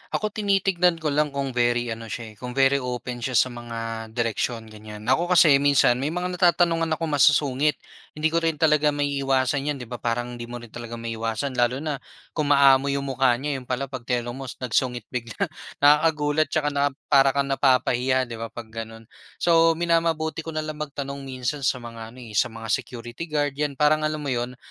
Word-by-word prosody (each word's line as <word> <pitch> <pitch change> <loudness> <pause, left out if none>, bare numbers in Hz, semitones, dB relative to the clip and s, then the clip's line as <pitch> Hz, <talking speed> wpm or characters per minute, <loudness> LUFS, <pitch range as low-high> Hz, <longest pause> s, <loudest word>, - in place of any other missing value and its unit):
Ako, 215 0 -1
tinitignan 195 -4 +2
ko 155 -2 0
lang 150 0 +1
kung 140 -1 -2
very 120 -1 +1
ano 115 0 -6
siya, 110 +1 -6
eh, - - -24
kung 125 0 -6
very 135 0 +4
open 125 -1 -5
siya 130 +2 -3
sa 130 - +4
mga 115 -1 -6
direksyon, 115 -1 -2
ganyan. 105 0 -10
Ako 165 +7 +3
kasi 165 -5 +6
minsan, 140 -3 +4
may 135 - -1
mga 180 +1 -2
natatanungan 170 -2 +3
akong 165 +1 -3
masusungit. 145 0 +3 0.4
Hindi 155 +1 0
ko 165 - +2
rin 165 -1 0
talaga 150 -1 +3
maiiwasan 140 -1 0
yan - - -7
di 120 - -9
ba, 125 - -5
parang 120 +1 -2
hindi 120 - -5
mo 120 - -7
rin 120 -2 -13
talaga 120 -1 -7
maiiwasan 115 +3 -3
lalo 125 +3 +1
na 150 -3 -3 0.3
kung 155 -2 -1
maamo 140 -1 +5
yung 140 0 -1
mukha 130 -2 +3
niya, 140 +2 -3
'yon 125 - -15
pala 130 +1 -3
'pag 130 -3 -7
tinanong 120 -1 -1
mo, 135 - -6
nagsungit 125 -1 -1
bigla. 115 -3 -5 0.5
Nakakagulat 150 0 +4
tsaka 150 -1 0
na 140 0 +2 0.2
para 135 -1 +5
kang 140 0 0
napapahiya 130 -1 +2
'di 120 -2 -7
ba, 115 - -4
'pag 115 -1 -10
gano'n. 115 0 -7 0.3
So, 165 -1 +4
minamabuti 165 -2 0
ko 160 - -5
nalang 155 -1 -4
magtanong 140 -2 -5
minsan 130 +2 -3
sa - - +2
mga 115 0 -9
ano, 130 - -11
eh, 115 - -11
sa - - +4
mga 115 -1 -7
security 120 +9 -4
guard, 145 -2 0
yan 145 -2 -1
parang 155 +2 +3
alam 155 -1 -4
mo 140 - -2
'yon, 120 0 -2
135 Hz, 200 wpm, -24 LUFS, 120-150 Hz, 0.5 s, kasi